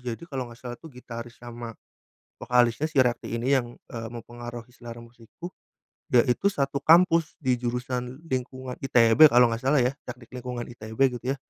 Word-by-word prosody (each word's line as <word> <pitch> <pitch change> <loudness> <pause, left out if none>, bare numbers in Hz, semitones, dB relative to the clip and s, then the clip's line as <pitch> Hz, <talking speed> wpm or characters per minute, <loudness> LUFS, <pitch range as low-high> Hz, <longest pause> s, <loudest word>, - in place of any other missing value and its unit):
Jadi, - - -15
kalo 135 -6 -5
enggak 120 0 -14
salah 120 -1 -6
tuh 165 - -11
gitaris 120 -3 -9
sama 120 -1 -9 0.7
vokalisnya 125 +4 +2
si 160 - -16
Rafi 120 -1 -2
ini 125 +4 0
yang, 120 -3 0
eee, 115 -1 -8
mempengaruhi 120 +1 -9
selera 120 -1 -10
musikku 120 +9 -12 0.6
yaitu 125 +8 +3
satu 140 -3 -1
kampus 165 -1 +5
di 130 -3 +1
jurusan 125 +2 -4
lingkungan 130 0 -4
ITB 120 0 +5
kalo 120 0 +6
enggak 115 +2 -4
salah 135 +1 +3
ya, 125 +2 +1
Teknik 125 0 -10
Lingkungan 125 -1 -5
ITB 110 -1 -10 0.2
gitu 125 +2 -2
ya. - - -5
125 Hz, 165 wpm, -26 LUFS, 120-130 Hz, 0.7 s, kalo